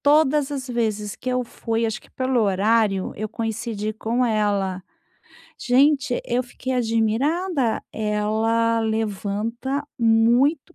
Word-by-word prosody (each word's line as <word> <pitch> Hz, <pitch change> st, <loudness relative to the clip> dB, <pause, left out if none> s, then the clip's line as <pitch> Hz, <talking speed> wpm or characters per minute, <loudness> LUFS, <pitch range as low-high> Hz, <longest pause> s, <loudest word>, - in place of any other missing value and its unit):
todas 290 Hz, -1 st, +3 dB
as 265 Hz, -2 st, -4 dB
vezes 215 Hz, -4 st, -2 dB
que 255 Hz, -, -6 dB
eu 250 Hz, 0 st, +1 dB
fui, 230 Hz, -1 st, -3 dB
acho 220 Hz, -, -2 dB
que -, -, -21 dB
pelo 255 Hz, -2 st, 0 dB
horário, 205 Hz, 0 st, +2 dB
eu 215 Hz, +1 st, -3 dB
coincidi 220 Hz, -1 st, -3 dB
com 230 Hz, +3 st, -1 dB
ela. 205 Hz, -4 st, 0 dB, 0.8 s
Gente, 270 Hz, 0 st, +3 dB
eu 245 Hz, +1 st, 0 dB
fiquei 255 Hz, +1 st, -6 dB
admirada, 250 Hz, -, 0 dB
ela 220 Hz, +2 st, +1 dB
levanta 225 Hz, +5 st, -2 dB
muito 240 Hz, +8 st, +3 dB
230 Hz, 115 wpm, -23 LUFS, 215-255 Hz, 0.8 s, todas